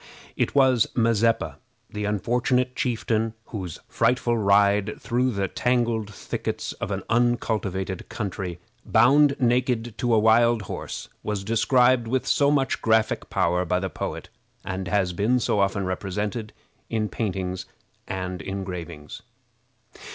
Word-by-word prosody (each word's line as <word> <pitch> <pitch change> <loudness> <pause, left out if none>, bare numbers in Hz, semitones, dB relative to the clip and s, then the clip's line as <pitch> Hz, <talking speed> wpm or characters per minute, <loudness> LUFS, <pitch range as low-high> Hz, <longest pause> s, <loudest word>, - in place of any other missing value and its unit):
It - - -1
was 130 -4 +4
Mazeppa, 115 -1 +2 0.3
the 105 -1 -4
unfortunate 125 +5 0
chieftain 115 -3 -1
whose 95 -7 -5
frightful 120 0 +1
ride 100 0 +3
through 125 +2 0
the 100 -5 -1
tangled 120 -2 0
thickets - - -4
of - - -5
an - - -3
uncultivated 110 -6 0
country, 95 -4 -4 0.3
bound 140 +3 +5
naked 120 -2 +1
to 120 -2 +2
a - - +4
wild 115 +1 +4
horse, - - -6
was 105 -2 -3
described 120 +3 +3
with 130 +2 0
so 140 0 +3
much 135 -3 +1
graphic 110 -1 +1
power 90 -1 +1
by 90 +1 0
the 95 0 -4
poet, - - -5 0.4
and 95 -1 -4
has 95 -3 +1
been 110 +8 +2
so 105 - 0
often 100 0 +1
represented 105 +4 -3 0.4
in 110 -2 0
paintings 95 -4 -3 0.4
and 90 -2 -4
engravings. 90 -5 -6
110 Hz, 130 wpm, -25 LUFS, 95-120 Hz, 0.4 s, bound